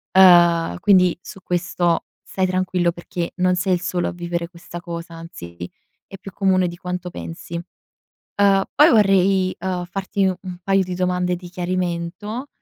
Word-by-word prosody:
Uhm, 175 - +6
quindi 185 -4 +4
su 195 - -11
questo 175 -1 0 0.2
stai 190 -1 -2
tranquillo 185 -1 0
perché, 170 0 -5
non 180 0 +2
sei 180 +1 +1
il 175 - +1
solo 180 -1 -1
a - - -4
vivere 170 0 -4
questa 175 0 -10
cosa. 170 -1 -7
Anzi, 85 - -10 0.5
è 195 - -11
più 195 0 -10
comune 185 -2 +2
di 175 - -6
quanto 180 0 -5
pensi. 85 - -9 0.8
Uhm, 195 -1 +4
poi 300 +3 +6
vorrei, 195 -3 +3
ehm, 180 -2 -3
farti 195 +2 -2
un 185 -1 -3
paio 195 -1 +2
di 180 0 -5
domande 180 0 0
di 175 0 -10
chiarimento 180 +6 -3
180 Hz, 155 wpm, -21 LUFS, 175-190 Hz, 0.8 s, Uhm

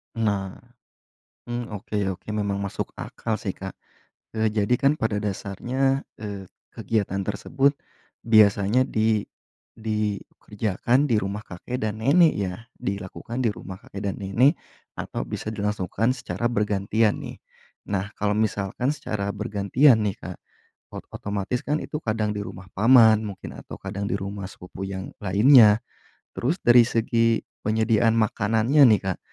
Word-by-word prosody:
Nah, 100 -4 -1 0.9
hmm, 120 -1 -4
oke 105 +1 -6 0.2
oke, - - -36
memang 100 -2 -1
masuk 100 -1 -4
akal 110 -2 -4
sih, 100 -3 -4
Kak. 95 0 -6 0.7
Eee, 110 -1 +1
jadi 105 +2 +2
kan 140 +3 +3
pada 110 -2 0
dasarnya, 120 +7 -1 0.2
eee, 100 -2 -6 0.2
kegiatan 105 -4 -2
tersebut 135 +7 +1 0.5
biasanya 110 +1 +4
di 110 -3 +1 0.5
dikerjakan 110 +2 -1
di 115 - +3
rumah 100 0 -2
kakek 120 +8 -5
dan 110 0 -3
nenek, 160 +4 +6
ya. 95 -3 -2 0.2
Dilakukan 100 +5 -5
di 125 - +2
rumah 95 -2 -7
kakek 100 +1 -9
dan - - -9
nenek, 115 +9 +3 0.4
atau - - -5
bisa - - -5
dilangsungkan 105 +2 -1
secara 125 -1 -5
bergantian, 105 -1 +1
nih. - - -8 0.5
Nah, 100 +1 -2
kalau 105 0 -1
misalkan 110 +4 0
secara 105 -8 -3
bergantian 110 +5 +3
nih, 100 -2 -1
Kak, - - -7 0.6
ot - - -7
otomatis 100 +4 -3
kan 150 +3 0
itu - - -5
kadang 110 -1 0
di 100 - -3
rumah 95 -1 -10
paman, 110 0 +6
mungkin, 100 -3 -7
atau - - -9
kadang 100 0 -4
di - - -4
rumah 100 0 -5
sepupu 95 0 -9
yang 95 -1 -5 0.2
lainnya. 105 +2 +6 0.6
Terus 155 +10 -1
dari 120 0 +7
segi 115 -1 +1 0.2
penyediaan 110 +1 +2
makanannya 110 +5 +3
nih, 105 -2 +4
Kak, - - -9
105 Hz, 140 wpm, -24 LUFS, 100-120 Hz, 0.9 s, dari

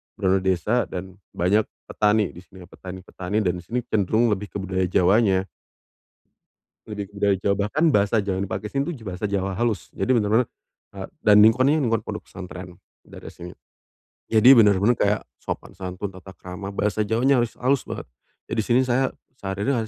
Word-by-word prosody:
bener-bener 95 0 +1
desa 105 +7 +1
dan 95 +1 -8 0.2
banyak 100 +5 +2 0.3
petani 105 -1 +2
di - - -12
sini 90 0 -14
petani-petani 95 +2 -5
dan 90 -3 +1
di - - -12
sini 120 +8 -2
cenderung 110 +3 +1
lebih 105 0 -2
ke - - -37
budaya 95 -1 -1
Jawanya. 95 +2 +3 1.4
Lebih 105 -2 -6
ke - - -28
budaya 100 -1 +3
Jawa. 100 +1 0
Bahkan 150 +9 -1
bahasa 100 -2 +2
Jawa 100 -2 -2
yang 100 - -1
dipakai 95 +3 -4
sini 140 0 0 0.2
bahasa 95 0 -4
Jawa 95 -1 -1
halus. 105 -8 -1
Jadi - - -3
bener-bener, 110 +2 +2 0.5
eee, - - -6
dan 105 -1 +6
lingkungannya, 130 +7 +4
lingkungan 115 -3 +1
pondok - - -5
pesantren 90 -1 -10 0.2
daerah - - -12
sini. 90 0 -10 0.8
Jadi, 115 +3 +6
bener-bener 105 0 +5
kayak 105 +1 +2 0.2
sopan - - -6
santun, 95 +2 -5
tata 95 0 -12
krama, 90 +2 -8
bahasa 105 +1 -1
Jawanya 125 +4 +3
halus-halus 125 +3 0
banget. - - -6 0.4
Jadi 115 - -2
di - - +1
sini, 120 +3 +3
saya 130 +2 +2 0.3
sehari-hari 105 +5 -2
100 Hz, 165 wpm, -23 LUFS, 95-115 Hz, 1.4 s, dan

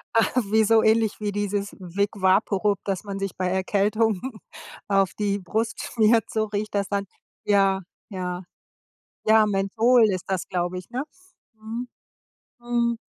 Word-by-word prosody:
Ah, 225 - +4 0.2
wie 220 0 +5
so 220 +1 +5
ähnlich 220 -1 +2
wie 210 -1 -2
dieses 205 0 -2
Wick 190 +3 -1
Vaporub, 200 +1 +2
das 195 -3 -2
man 200 -1 -5
sich 195 -1 -3
bei 185 - -1
Erkältungen 200 +2 +1 0.7
auf 195 -2 +2
die 205 -1 -1
Brust 220 +5 -2
schmiert, 225 0 +2
so 220 -1 0
riecht 210 0 -4
das 200 -1 0
dann. 200 -1 -1 0.4
Ja, 195 -1 +3 0.3
ja, 180 -2 -4 0.8
ja, 220 0 +5
Menthol 220 +4 +3
ist 185 -2 -3
das, 190 -2 -1
glaube 180 0 -2
ich, 180 - -10
ne? 250 +2 -2 0.5
Mhm. 225 +3 -6 0.7
Mhm. 240 -1 0
205 Hz, 145 wpm, -24 LUFS, 195-220 Hz, 0.8 s, wie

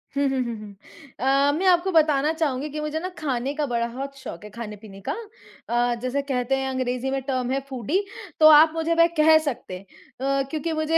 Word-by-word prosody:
हुँ, 280 0 +2
हुँ, 265 -1 -1
हुँ, 235 -2 -4
हुँ। 210 -1 -11 0.4
अ, 275 +2 +3
मैं 380 - -1
आपको 365 +1 +3
बताना 305 -3 +3
चाहूँगी 300 -3 -1
कि 300 +1 -5
मुझे 305 +1 -2
ना 365 +3 -4
खाने 270 -3 -2
का 295 0 -1
बड़ा 235 -2 -1
होत 275 +1 -5
शौक 210 -8 -9
है 210 - -9
खाने-पीने 210 -3 -9
का। - - 0 0.6
अ, 240 0 +1
जैसे 255 +3 -1
कहते 265 -1 -1
हैं 265 0 -2
अंग्रेज़ी 255 0 -2
में 270 0 -1
टर्म 255 -2 -2
है 270 - +1
फूडी। 265 - -1 0.4
तो 310 - +8
आप 310 +1 +8
मुझे 325 +1 0
वह 335 0 +6
कह 315 +1 +7
सकते 235 -9 -4
हैं। 195 - -15 0.6
अ, - - 0
क्योंकि 320 +2 -3
मुझे 315 +1 +1
275 Hz, 215 wpm, -24 LUFS, 245-310 Hz, 0.6 s, तो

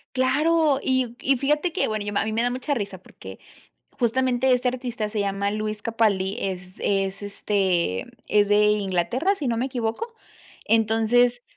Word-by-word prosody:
Claro, 295 +3 +2
y 255 -2 0
y 275 0 +2
fíjate 300 +6 0
que, 375 - 0
bueno, 215 -1 -2
yo 205 - -4
a - - +2
mí 220 - -3
me 225 +2 +1
da 245 - +1
mucha 255 +4 -2
risa, 200 -6 -4
porque 185 - -12 0.5
justamente 255 +1 +1
este 250 0 +2
artista 245 -3 -3
se 210 0 -3
llama 200 0 -1
Luis 215 0 -3
Capalli, 205 -4 +1
es 190 -2 -3 0.2
es, 195 0 -1
este, 190 - 0 0.2
es 205 -1 +3
de 210 0 +4
Inglaterra, 210 - +1
si 305 -8 -4
no 230 - 0
me 250 - 0
equivoco. 255 - -3 0.5
Entonces, 225 +2 +2
225 Hz, 165 wpm, -24 LUFS, 205-260 Hz, 0.5 s, de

